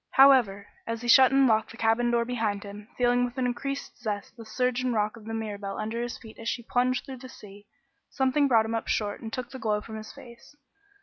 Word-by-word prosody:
However, 250 -8 +5 0.2
as 230 +1 -4
he - - -4
shut 260 +2 +7
and 270 0 +5
locked 220 -3 +2
the 225 - -12
cabin 230 +1 +2
door 235 -1 +1
behind 220 -4 -2
him, 205 +1 -10
feeling 245 0 +3
with 245 +1 -4
an 255 - 0
increased 275 +3 -4
zest 210 -3 -4
the 230 - -10
surge 250 +3 0
and 250 -2 -1
rock 210 +1 0
of 225 -2 -14
the 225 - -5
Mirabelle 205 -3 -5
under 220 +2 -3
his 240 0 -4
feet 220 -1 -14
as 230 0 -3
she 240 - -3
plunged 250 +2 0
through 265 -1 -8
the 255 +1 -11
sea, 205 -3 -14 0.4
something 275 +2 +2
brought 225 -4 +4
him 225 - -3
up 225 - -2
short 205 -2 -1
and 225 - -6
took 255 -1 -5
the 260 - -8
glow 210 -3 0
from 220 +1 -8
his 215 0 -9
face. 235 +4 -15
230 Hz, 240 wpm, -27 LUFS, 215-250 Hz, 0.4 s, shut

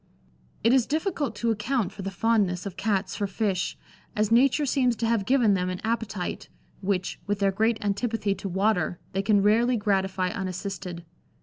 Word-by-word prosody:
It 230 +3 +5
is 260 -3 +3
difficult 305 - -1
to 230 +2 0
account 225 +1 -1
for 195 - -9
the 195 - -3
fondness 195 -2 +1
of 195 -2 -5
Cats 195 -3 -1
for 205 -1 -1
fish, 195 -2 -1 0.4
as 215 0 +1
nature 270 +5 +4
seems 255 -3 +2
to 230 - -2
have 225 -3 +1
given 245 -6 +4
them 180 -1 0
an 180 0 -4
appetite, 220 -5 -3 0.3
which, 190 -2 -1
with 205 0 0
their 200 -1 +2
great 220 +3 +1
antipathy 205 0 0
to 195 0 -6
water, 190 -2 +1
they 195 - 0
can 200 0 +3
rarely 235 +4 +3
gratify 190 -3 0
unassisted. 185 -2 -5
205 Hz, 175 wpm, -26 LUFS, 190-230 Hz, 0.4 s, It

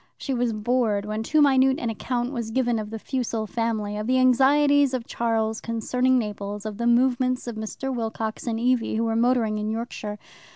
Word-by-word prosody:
She 275 - -3
was 245 -1 0
bored 215 -2 0
when 215 +1 -3
too 300 +6 +3
minute 265 -1 +4
an 235 - -2
account 245 +3 -2
was 235 -4 -3
given 240 -1 0
of 210 -1 -5
the 225 - -5
Fussell 230 -2 -3
family, 215 -2 -2
of 210 +1 -4
the 255 +1 +3
anxieties 275 +2 +4
of 240 -2 -4
Charles 225 -1 -1
concerning 250 +3 +1
Naples, 205 -2 -4
of 215 -2 -5
the 235 - 0
movements 255 +1 +2
of 240 -2 -5
Mr. 235 +5 -4
Wilcox 225 -1 -4
and 225 -1 -1
Evie, 245 -1 +1
who 225 - 0
were 225 -1 0
motoring 230 -2 +2
in 210 0 -2
Yorkshire. 220 -2 -4
235 Hz, 195 wpm, -24 LUFS, 220-255 Hz, -, minute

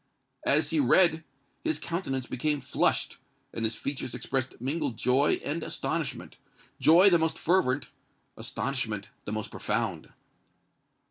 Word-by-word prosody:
As - - +3
he 315 - +2
read, 170 - +4 0.4
his 320 -1 0
countenance 135 -7 -3
became 145 +4 -1
flushed, 130 - +1 0.4
and 115 - -4
his 110 0 0
features 135 -3 -4
expressed 130 -1 -3
mingled 130 -2 -2
joy 130 +4 +2
and 155 +4 -2
astonishment—joy 180 +5 +1
the 170 - +5
most 160 0 0
fervent, 145 -7 +1 0.5
astonishment 110 -5 -3 0.2
the - - -4
most 110 0 -4
profound. - - -2
140 Hz, 120 wpm, -28 LUFS, 125-170 Hz, 0.5 s, the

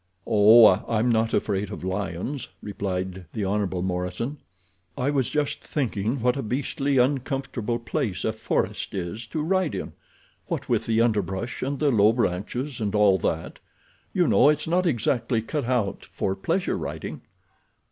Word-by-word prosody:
"Oh, 110 +1 +7 0.3
I'm 115 +2 +2
not 115 -1 +2
afraid 100 -1 0
of - - -7
lions," 95 - -3 0.2
replied 95 -3 -4
the 105 -3 -2
Hon. 95 -2 -1
Morison. 95 +10 -3 0.6
"I 130 +3 +1
was 135 -4 +1
just 150 -1 -1
thinking 120 -3 -1
what 125 +1 +2
a 140 - -2
beastly 135 +3 -1
uncomfortable 130 -3 0
place 115 -5 -2
a 110 - +1
forest 110 -2 -2
is 95 +5 -4
to 155 +5 -3
ride 185 0 +1
in. - - -5 0.5
What - - -3
with - - 0
the 115 0 +3
underbrush 105 -1 -1
and 140 +2 -2
the 145 +1 +2
low 110 -1 +5
branches 120 +5 -2
and 105 -1 -1
all 100 -3 +5
that, 80 0 -2 0.5
you - - +2
know, 140 - +5
it's 150 - +1
not 180 +2 +2
exactly 120 -3 +1
cut 140 +5 -3
out 120 -6 0
for 95 - -3
pleasure 180 - -1
riding." - - -5
115 Hz, 155 wpm, -25 LUFS, 100-135 Hz, 0.6 s, Oh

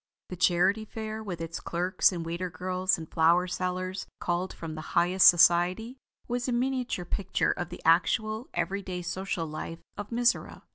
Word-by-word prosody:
The 180 - -5
Charity 180 +4 +2
Fair, 220 0 -6
with 185 -6 -6
its 165 0 -5
clerks 180 +4 +1
and 170 -3 -4
waiter 170 +2 -3
girls 185 +2 0
and 160 -1 -8
flower 170 +3 +3
sellers 185 +1 -3
called 175 +2 -1
from 165 -2 -7
the 155 - -6 0.2
highest 180 +2 +5
society, 180 +8 +4 0.3
was 245 +1 -2
a - - 0
miniature 250 -6 -1
picture 190 +1 0
of 175 -2 -4
the 175 - -10
actual 215 +8 +2
every 200 +1 -1
day 180 -2 -5
social 185 -1 -3
life 160 +2 -7
of 205 0 -6
Mizora. 240 +1 0
185 Hz, 170 wpm, -28 LUFS, 175-210 Hz, 0.3 s, highest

